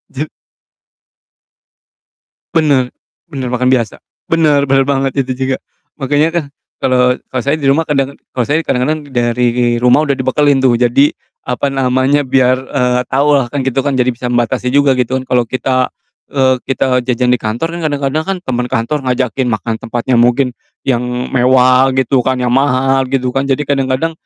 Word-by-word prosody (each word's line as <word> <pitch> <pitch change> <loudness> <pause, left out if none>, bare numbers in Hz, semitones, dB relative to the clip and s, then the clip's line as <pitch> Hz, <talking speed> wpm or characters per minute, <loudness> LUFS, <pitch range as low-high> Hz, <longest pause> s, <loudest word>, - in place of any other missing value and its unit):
Je 150 +3 -3 2.3
Bener, 140 -6 +2 0.3
bener 135 -6 -5
bahkan 125 +1 +1
biasa. 120 -4 0 0.3
Bener 150 -4 +3
bener 135 0 +3
banget 135 -1 0
itu 130 -1 0
juga. 130 0 -1 0.4
Makanya 145 +3 +1
kan 170 - 0 0.4
kalo 125 -1 +3
kalo 130 - -2
saya 140 +3 0
di 145 - -4
rumah 150 +4 +2
kadang 140 -1 0 0.2
kalo 125 - 0
saya 145 +6 +1
kadang-kadang 145 +3 -1
dari 120 -1 +1
rumah 125 +5 +4
udah 140 - +1
dibekelin 135 +2 +2
tuh, 125 -3 +3
jadi 125 +4 +3 0.4
apa 125 +3 -1
namanya, 135 +2 +1
biar, 130 -1 +3
eee, 125 -2 0
tau 140 +3 +1
lah 130 - 0
kan 135 +3 -3
gitu 135 0 -2
kan, 140 - +1
jadi 125 -1 +2
bisa 125 +1 -6
membatasi 120 +1 -1
juga 140 -2 +3
gitu 130 +1 0
kalo 125 -2 0
kita, 130 +1 0 0.4
eee, 130 -2 +2
kita 130 -1 +1
jajan 125 0 +1
di 125 - +3
kantor 115 +10 -3
kan 170 - -6
kadang-kadang 145 +1 -1
kan 195 - -1
temen 125 -5 -2
kantor 120 +5 -1
ngajakin 125 0 0
makan 110 +2 -3
tempatnya 120 +2 -1
mungkin 125 +2 +3 0.3
yang 125 -3 0 0.3
mewah 130 +1 +4
gitu 130 0 +1
kan, 130 - +1
yang 125 - 0
mahal 135 0 +2
gitu 130 -1 -1
kan, 135 +2 -1
jadi 135 +1 0
kadang-kadang, 135 +3 -1
130 Hz, 165 wpm, -14 LUFS, 125-140 Hz, 2.3 s, rumah